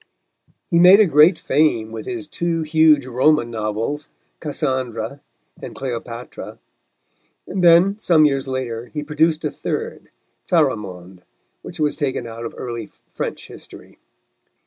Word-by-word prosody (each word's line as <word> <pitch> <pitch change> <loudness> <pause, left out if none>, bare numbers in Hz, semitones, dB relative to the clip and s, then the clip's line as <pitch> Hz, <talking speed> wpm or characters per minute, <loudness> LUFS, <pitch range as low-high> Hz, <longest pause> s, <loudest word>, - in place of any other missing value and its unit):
He 170 - +4
made 180 +3 +8
a 215 - +6
great 155 +1 +5
fame 120 -8 +1
with 110 -1 -7
his 175 -4 -5
two 165 +1 -2
huge 155 -3 +4
Roman 130 0 +2
novels, 115 +7 -3 0.3
Cassandra 130 -4 -3 0.4
and - - -8
Cleopatra, 120 -2 -7 0.9
and 185 -1 -3
then, 175 +4 +5
some 160 -6 +4
years 135 -2 0
later, 125 -3 -4
he 150 +4 -5
produced 155 +1 0
a - - -1
third, 460 +1 -5 0.4
Pharamond 95 - -1 0.4
which 175 - -10
was 150 -1 +1
taken 135 -5 -2
out 115 0 -7
of - - -7
early 115 -4 -6 0.2
French - - -5
history. - - -14
145 Hz, 130 wpm, -20 LUFS, 115-160 Hz, 0.9 s, made